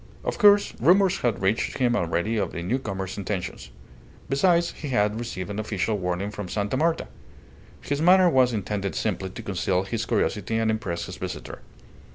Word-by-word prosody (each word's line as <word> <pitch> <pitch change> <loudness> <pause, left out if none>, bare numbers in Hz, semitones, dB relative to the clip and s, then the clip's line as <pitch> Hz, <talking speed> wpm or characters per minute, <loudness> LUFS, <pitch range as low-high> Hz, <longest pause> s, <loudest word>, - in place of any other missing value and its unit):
Of - - -3
course, 205 -2 +6
rumours 185 +6 +4
had 120 -5 -1
reached 100 +4 0
him 125 -3 +2
already 85 +4 0
of 105 - -1
the 85 - -4
newcomer's 95 -3 -3
intentions. 95 -10 -4 0.6
Besides, 170 +5 +3
he 150 - -8
had 105 -3 +1
received 105 -5 -5
an 100 - -4
official 110 0 -1
warning 90 +3 -2
from 105 -3 -6
Sta. 105 +5 -1
Marta. 165 +4 +1 0.7
His 145 +1 -2
manner 185 +2 +6
was 130 -6 +4
intended 100 -2 -3
simply 95 -3 -2
to - - -9
conceal 95 -1 0
his 115 +3 -3
curiosity 110 +1 0
and 110 -1 +2
impress 100 -6 -3
his - - -8
visitor. - - -6
110 Hz, 170 wpm, -25 LUFS, 95-130 Hz, 0.7 s, course